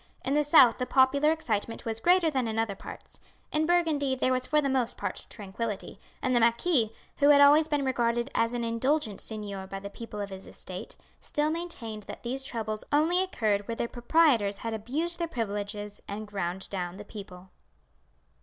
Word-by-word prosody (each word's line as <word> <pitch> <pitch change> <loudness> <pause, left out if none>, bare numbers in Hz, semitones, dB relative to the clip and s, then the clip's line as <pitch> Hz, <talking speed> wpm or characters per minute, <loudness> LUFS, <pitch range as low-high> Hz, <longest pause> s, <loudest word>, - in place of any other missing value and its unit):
In 270 - +1
the 295 +1 +3
south 280 -6 +6
the 250 - -1
popular 280 +3 +4
excitement 230 -8 -2
was 225 -1 -2
greater 350 +3 +4
than 260 -4 0
in 220 0 -3
other 225 -2 0
parts. 195 - -11 0.3
In 310 +1 +1
Burgundy 315 -6 +2
there 255 0 +1
was 255 0 -1
for 300 - +3
the 285 - +1
most 260 -3 0
part - - -4
tranquility; 210 0 -5 0.2
and 255 -1 +1
the - - +5
marquis, 235 +1 +3 0.3
who 285 0 +4
had 290 -1 +7
always 295 +2 +7
been 295 -3 0
regarded 240 -2 +1
as 230 +1 +1
an 240 - -2
indulgent 230 -1 0
seigneur 200 -3 -5
by 195 - -6
the 200 +1 -8
people 220 -1 -8
of 200 -1 -4
his 190 0 -9
estate, - - -8 0.2
still 300 +1 -1
maintained 295 -11 -5
that - - -8
these 255 +3 -2
troubles 220 -5 -4
only 320 +5 +3
occurred 215 - 0
where 230 - -3
the 235 - -2
proprietors 240 -5 +2
had 230 +1 -4
abused 300 +11 -2
their 340 - 0
privileges 205 -5 -4
and 210 +2 -5
ground 190 -2 -3
down 180 -2 -4
the 205 - -9
people. 190 -3 -10
235 Hz, 190 wpm, -28 LUFS, 210-290 Hz, 0.3 s, had